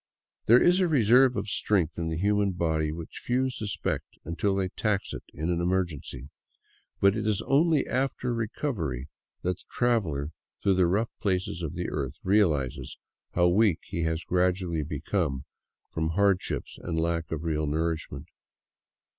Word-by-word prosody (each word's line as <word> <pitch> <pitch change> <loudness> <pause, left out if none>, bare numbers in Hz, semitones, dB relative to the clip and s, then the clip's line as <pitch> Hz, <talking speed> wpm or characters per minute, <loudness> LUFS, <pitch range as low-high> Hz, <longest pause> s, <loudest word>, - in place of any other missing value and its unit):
There 120 +3 +8
is 175 +5 +4
a 185 - +3
reserve 125 -3 +5
of - - -2
strength 95 -5 +1
in 85 - -2
the 80 -1 -2
human 100 +1 +2
body 80 -3 0
which 80 0 -8
few 130 +2 +1
suspect 110 -5 -3
until 90 +5 0
they 95 -1 0
tax 105 +1 -1
it - - -5
in 80 +3 -2
an 85 0 0
emergency; 85 -7 -2 0.7
but 100 +1 +4
it 110 -1 -2
is 105 -2 +1
only 150 +1 +3
after 130 -1 -1
recovery 100 - -3 0.3
that 90 0 0
the - - -18
traveler 90 - 0 0.3
through 100 - +4
the 90 -2 +4
rough 105 +6 0
places 95 -3 -1
of 80 -4 -4
the 90 +1 -2
earth 70 -4 -3
realizes 85 - +1 0.4
how 90 0 +4
weak 100 -2 +3
he 85 -3 -4
has 80 0 -1
gradually 90 -1 +1
become 75 -1 -2 0.5
from 80 0 -1
hardships 100 +1 0
and 80 -2 -2
lack 85 0 -1
of 80 -1 -3
real 75 -2 -1
nourishment. 80 +2 -2
90 Hz, 155 wpm, -28 LUFS, 80-105 Hz, 0.7 s, There